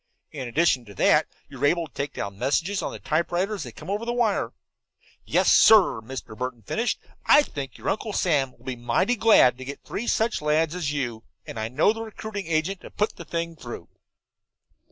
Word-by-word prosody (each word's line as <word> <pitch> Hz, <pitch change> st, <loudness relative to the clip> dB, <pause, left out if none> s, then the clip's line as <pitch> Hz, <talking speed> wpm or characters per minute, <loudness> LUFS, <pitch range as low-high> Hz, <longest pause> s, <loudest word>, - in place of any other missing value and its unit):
In 135 Hz, -5 st, -5 dB
addition 130 Hz, -1 st, +2 dB
to 100 Hz, -2 st, -13 dB
that, -, -, +4 dB, 0.2 s
you 135 Hz, -, -12 dB
are -, -, +3 dB
able 170 Hz, +2 st, +1 dB
to 135 Hz, -, -32 dB
take 140 Hz, 0 st, -4 dB
down 100 Hz, 0 st, -5 dB
messages 165 Hz, +10 st, 0 dB
on -, -, -3 dB
the -, -, -7 dB
typewriter 175 Hz, +6 st, -1 dB
as 205 Hz, -, -4 dB
they -, -, -6 dB
come 155 Hz, -, -12 dB
over 205 Hz, +3 st, -2 dB
the 235 Hz, -, -2 dB
wire. 230 Hz, -4 st, +1 dB, 0.7 s
Yes, -, -, +3 dB
sir," 200 Hz, -, +6 dB
Mr. 120 Hz, -1 st, -8 dB
Burton 125 Hz, -1 st, -5 dB
finished, 230 Hz, -, -1 dB, 0.3 s
"I 295 Hz, -, +7 dB
think 135 Hz, -, -7 dB
your -, -, -8 dB
Uncle 215 Hz, +2 st, -1 dB
Sam 145 Hz, -9 st, +1 dB
will 120 Hz, -, -23 dB
be 130 Hz, -1 st, -3 dB
mighty 120 Hz, -, +1 dB
glad 210 Hz, -, +5 dB
to -, -, -6 dB
get 140 Hz, +1 st, -8 dB
three 235 Hz, -, -5 dB
such 225 Hz, -4 st, +1 dB
lads 150 Hz, +1 st, +1 dB
as 175 Hz, -5 st, -2 dB
you, 120 Hz, -6 st, -3 dB, 0.2 s
and 115 Hz, -, -7 dB
I 110 Hz, -, -2 dB
know 145 Hz, -, +3 dB
the 225 Hz, -, -6 dB
recruiting 215 Hz, -3 st, -6 dB
agent 165 Hz, +4 st, -1 dB
to -, -, -10 dB
put 210 Hz, -, -2 dB
the 170 Hz, -, -9 dB
thing 170 Hz, +1 st, -3 dB
through." 120 Hz, -6 st, -9 dB
155 Hz, 210 wpm, -25 LUFS, 130-200 Hz, 0.7 s, I